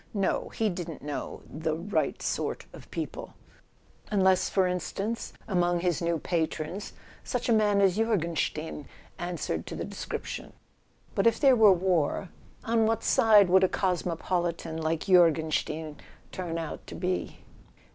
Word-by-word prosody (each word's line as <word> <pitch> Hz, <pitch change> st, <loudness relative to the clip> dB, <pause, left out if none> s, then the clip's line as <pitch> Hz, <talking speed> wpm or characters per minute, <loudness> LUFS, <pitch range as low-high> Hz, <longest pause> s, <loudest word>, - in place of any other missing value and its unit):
No, 195 Hz, -2 st, 0 dB
he 220 Hz, -, -1 dB
didn't 175 Hz, -5 st, -5 dB
know 145 Hz, -1 st, -5 dB
"the 155 Hz, +1 st, -2 dB
right 195 Hz, +5 st, -1 dB
sort -, -, -2 dB
of -, -, -13 dB
people"... -, -, -6 dB, 0.7 s
unless, 190 Hz, -3 st, +3 dB
for 190 Hz, -2 st, +2 dB
instance, 195 Hz, +5 st, -3 dB, 0.2 s
among 175 Hz, -3 st, +1 dB
his 175 Hz, -3 st, 0 dB
new 170 Hz, 0 st, +1 dB
patrons, 165 Hz, +3 st, -3 dB, 0.3 s
such -, -, -2 dB
a 235 Hz, -, +4 dB
man 210 Hz, -2 st, +3 dB
as 195 Hz, -1 st, +3 dB
Jorgenstein 165 Hz, -, -1 dB, 0.3 s
answered 170 Hz, -, -3 dB
to -, -, -5 dB
the -, -, -4 dB
description. -, -, -6 dB, 0.6 s
But, 195 Hz, -, +3 dB
if 230 Hz, -, +3 dB
there 270 Hz, -3 st, +6 dB
were 220 Hz, -4 st, +7 dB
war, 180 Hz, -1 st, +1 dB, 0.3 s
on 225 Hz, -1 st, +2 dB
what 225 Hz, 0 st, 0 dB
side 220 Hz, -6 st, +6 dB
would 190 Hz, +1 st, +5 dB
a 185 Hz, -, +4 dB
cosmo¬ 180 Hz, -3 st, -1 dB
politan 170 Hz, -2 st, -2 dB
like 160 Hz, 0 st, 0 dB
Jorgenstein 160 Hz, -3 st, +2 dB, 0.3 s
turn 175 Hz, -3 st, -4 dB
out 165 Hz, -2 st, -6 dB
to -, -, -8 dB
be 180 Hz, 0 st, -3 dB
180 Hz, 145 wpm, -28 LUFS, 165-200 Hz, 0.7 s, were